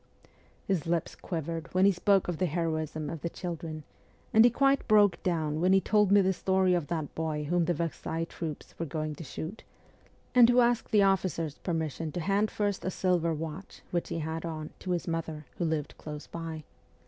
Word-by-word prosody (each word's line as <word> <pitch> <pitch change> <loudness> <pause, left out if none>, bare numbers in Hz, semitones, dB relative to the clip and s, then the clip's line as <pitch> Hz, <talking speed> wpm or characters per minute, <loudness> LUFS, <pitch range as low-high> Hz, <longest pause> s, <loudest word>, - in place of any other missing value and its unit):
His 180 -4 -1
lips 170 -1 0
quivered 165 -1 -4
when 185 +1 +5
he 200 - +7
spoke 195 +1 +2
of 175 -3 -3
the 185 - +2
heroism 155 -2 -2
of 165 - -5
the 170 - -2
children; 165 -3 -5 0.5
and 220 - +8
he 240 - +7
quite 275 +3 +2
broke 205 -4 +5
down 160 -3 0
when 185 +2 +4
he 195 - +6
told 210 0 +3
me 200 0 +7
the 190 0 +2
story 190 0 +2
of 170 -5 0
that 160 -3 -3
boy 155 -2 -2
whom 170 +3 +1
the 175 - +1
Versailles 165 0 -2
troops 165 -2 -6
were 165 - -1
going 155 +1 -3
to 155 - -8
shoot, 160 - -6 0.7
and 245 -2 +7
who 245 +1 +5
asked 240 -1 +2
the 210 -2 +5
officer's 180 -6 0
per 175 - -3
mission 160 0 -2
to - - -2
hand 200 +5 +1
first 205 -2 -1
a - - -1
silver 180 -3 +1
watch, 160 +4 -6
which 175 -1 -1
he - - -2
had 160 +1 -3
on, 155 -2 -5
to 185 - -7
his 175 -2 -1
mother, 160 -2 -3
who 175 - 0
lived 155 -2 -1
close 150 -1 -7
by. 165 -2 -6
170 Hz, 205 wpm, -29 LUFS, 160-190 Hz, 0.7 s, and